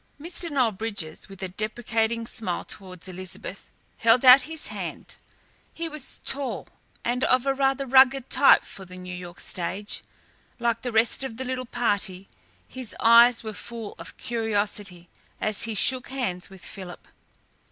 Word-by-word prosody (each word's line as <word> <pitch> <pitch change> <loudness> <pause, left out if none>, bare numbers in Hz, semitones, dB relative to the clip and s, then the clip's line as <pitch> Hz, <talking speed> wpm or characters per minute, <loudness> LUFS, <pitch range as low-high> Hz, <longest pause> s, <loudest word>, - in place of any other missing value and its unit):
Mr. 340 +2 -4
Noel 260 -6 +2
Bridges, 200 -5 -5
with 195 0 -10
a - - -1
deprecating 225 +3 -1
smile 220 -6 -3
towards 185 -2 -7
Elizabeth, 185 +1 -7 0.3
held 230 +3 +4
out 255 +2 +10
his 320 -1 -4
hand. - - -6 0.6
He 335 0 -3
was 305 -4 -7
tall 275 -1 -1 0.4
and 245 +2 0
of 255 0 +3
rather 270 0 +2
a - - -8
rugged 265 0 +6
type - - +6
for 195 - -10
the 185 0 -11
New 180 0 -7
York 175 -1 -8
stage. 190 +4 -4 0.6
Like 235 -1 0
the 245 - -3
rest 225 +3 +2
of 225 -4 -5
the 260 - -4
little 255 0 -3
party, 200 -6 -1 0.4
his 255 -3 -7
eyes 235 +1 +7
were 220 -1 -5
full 220 +4 -7
of - - -8
curiosity 205 -5 -2 0.3
as 215 0 +1
he 225 -1 -3
shook 250 +5 +2
hands 195 -10 -3
with 190 -2 -13
Philip. 185 -3 -9
225 Hz, 155 wpm, -26 LUFS, 190-255 Hz, 0.6 s, out